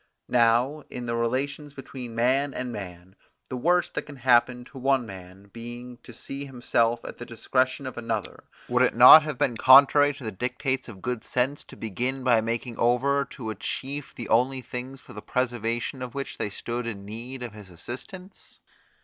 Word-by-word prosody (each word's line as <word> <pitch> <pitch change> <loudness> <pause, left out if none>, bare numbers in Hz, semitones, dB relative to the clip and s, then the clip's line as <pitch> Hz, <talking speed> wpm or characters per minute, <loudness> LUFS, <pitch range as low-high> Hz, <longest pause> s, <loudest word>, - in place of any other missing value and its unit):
Now 125 +5 +3
in 125 -1 -6
the 115 0 -2
relations 140 +5 -2
between 125 -3 -8
man 130 +4 +1
and 125 -1 -3
man, 95 -2 -9 0.3
the 130 - -4
worst 175 +7 +1
that - - -2
can 145 -1 -12
happen 125 -1 +3
to 130 - -11
one 135 -1 +2
man 95 0 -12
being 120 +1 -8
to 120 - -14
see 135 +4 -7
himself 120 -3 0
at - - -8
the - - -5
discretion 130 +3 -1
of 130 -2 -6
another, 115 -4 -4 0.2
would 125 +1 +2
it 130 - +3
not 125 +6 +11
have 150 -3 -5
been 120 - +1
contrary 140 +3 +7
to 140 - -11
the 110 - -3
dictates 125 +5 -2
of 100 -6 -11
good 125 -2 -3
sense 130 +3 -1
to - - -13
begin 125 +5 -3
by 120 -3 +4
making 115 +1 -3
over 140 +4 +2
to 125 -5 -7
a - - -6
chief 135 +8 -5
the 120 - -7
only 130 +3 +2
things 125 +2 -7
for - - -15
the 105 - -8
preservation 120 +1 -2
of 125 0 -6
which 140 0 -5
they - - -1
stood 120 +4 -4
in 100 -4 -6
need 120 +5 -7
of 120 -4 -6
his 105 -3 -12
assistance? 130 - -9
125 Hz, 190 wpm, -26 LUFS, 115-135 Hz, 0.3 s, not